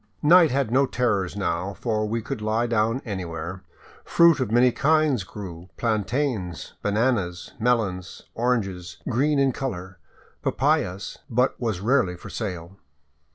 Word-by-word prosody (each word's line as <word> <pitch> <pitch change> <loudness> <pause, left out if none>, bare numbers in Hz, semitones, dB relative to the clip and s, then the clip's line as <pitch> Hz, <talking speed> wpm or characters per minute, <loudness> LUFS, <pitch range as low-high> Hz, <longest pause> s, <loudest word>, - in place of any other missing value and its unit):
Night 170 +1 +7
had 135 -4 0
no 135 +2 +4
terrors 100 -9 0
now, 95 0 -2
for 110 -3 -1
we 115 +1 -2
could 120 -1 -5
lie 110 +2 +1
down 115 +2 0
anywhere. 90 -3 -5 0.4
Fruit 170 -3 +5
of 130 - -1
many 120 +2 +5
kinds 150 -4 +2
grew, 95 -3 -9
— - - -42
plantains, 110 - -1
bananas, 100 -4 0
melons, 110 -7 -1
oranges 95 -7 -1
green 140 +5 +2
in 135 -1 +3
color, 95 -9 -5 0.4
papayas, 95 +3 0
— - - -41
but 130 - +3
was 110 -6 -1
rarely 105 -6 +2
for - - -10
sale. 90 -3 -5
110 Hz, 140 wpm, -24 LUFS, 95-125 Hz, 0.4 s, Night